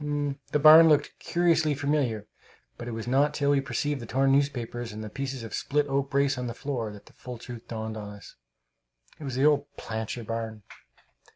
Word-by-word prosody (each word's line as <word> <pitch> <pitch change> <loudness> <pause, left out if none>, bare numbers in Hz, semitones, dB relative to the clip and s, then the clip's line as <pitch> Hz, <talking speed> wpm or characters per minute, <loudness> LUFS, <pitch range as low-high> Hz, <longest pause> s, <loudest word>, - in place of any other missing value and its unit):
The - - +3
barn 155 +2 +9
looked 150 -2 +3
curiously 165 -3 +2
familiar; 140 -7 0 0.5
but 120 - -8
it - - -4
was 115 -1 -5
not 140 +4 +2
till 140 -1 +2
we 140 -1 +3
perceived 145 0 -2
the 115 - -8
torn 135 +2 +2
newspapers 120 -4 0
and 110 +1 -7
the 105 - -7
pieces 135 -1 -4
of 115 - -8
split 145 +1 0
oak 135 -1 -1
brace 140 -1 +1
on 125 - -3
the 115 - -5
floor 125 -7 -3
that 105 -1 -13
the - - -19
full 125 -1 -8
truth 120 0 -10
dawned 110 -1 -5
on 105 -1 -6
us. 105 0 -12 0.8
It 150 - -7
was 130 -3 -4
the 135 +3 +2
old 145 -1 +3
Plancher 110 +1 -4
barn! 110 -1 -5
135 Hz, 200 wpm, -27 LUFS, 115-145 Hz, 0.8 s, barn